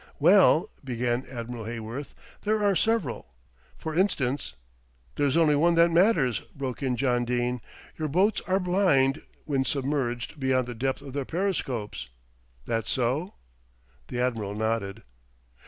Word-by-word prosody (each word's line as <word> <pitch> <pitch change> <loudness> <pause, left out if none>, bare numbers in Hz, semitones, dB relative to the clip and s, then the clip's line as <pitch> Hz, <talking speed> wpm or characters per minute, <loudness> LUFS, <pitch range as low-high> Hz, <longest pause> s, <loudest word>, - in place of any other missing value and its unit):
"Well," 175 0 +5
began 125 -1 -1
Admiral 120 -2 -6
Heyworth, 115 +4 -6 0.3
"there 215 0 +1
are 200 -1 +3
several. 160 - -1 0.4
For 160 -1 -5
instance 140 - 0 0.3
" - - -36
"There's 145 +1 +2
only 155 -3 +5
one 170 +4 +3
that 170 0 +5
matters," 165 - +3 0.2
broke 135 -2 -4
in 130 -2 0
John 125 -1 +1
Dene; 120 0 -1 0.4
"your 155 - 0
boats 190 +8 +2
are 190 +1 +2
blind 175 -7 +2 0.2
when 135 -3 +1
submerged 135 -1 -2
beyond 130 -2 +2
the 120 - -4
depth 130 +4 -2
of 135 -2 -9
their 140 0 -1
periscopes. 130 - -2 0.6
That 115 -1 -1
so?" 135 - -1 0.7
The 125 - -4
Admiral 115 -5 -1
nodded. 110 -1 -2
130 Hz, 140 wpm, -27 LUFS, 120-165 Hz, 0.7 s, Well